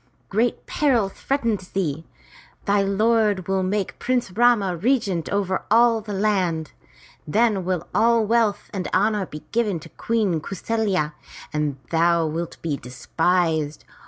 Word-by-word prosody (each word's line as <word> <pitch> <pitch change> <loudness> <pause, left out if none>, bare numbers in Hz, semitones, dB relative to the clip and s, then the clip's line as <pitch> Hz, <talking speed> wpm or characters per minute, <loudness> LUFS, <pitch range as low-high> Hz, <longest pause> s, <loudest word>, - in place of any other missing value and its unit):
'' - - -39
Great 230 +4 0
peril 245 -9 +1
threatens 230 -5 -2
thee. 165 -5 -3 0.6
Thy 200 0 +3
lord 205 -1 +2
will 190 0 +1
make 195 +1 -2
Prince 250 -5 0
Rama 215 -4 +3
regent 200 - 0
over 195 -2 -1
all 230 +1 +4
the 210 0 -8
land! 190 -6 0 0.6
Then 210 +2 +2
will 180 -2 -2
all 230 +1 +3
wealth 225 -2 +1
and 190 -2 -3
honor 205 -1 +1
be 150 0 -9
given 215 -6 0
to 165 - -12
Queen 205 -8 -1
Kau 195 - -6
saFya, 190 -7 -1 0.4
and 150 -2 -1
thou 170 0 +3
wilt 165 +2 -4
be 155 -4 -1
despised. 160 +4 -1
195 Hz, 140 wpm, -23 LUFS, 170-220 Hz, 0.6 s, all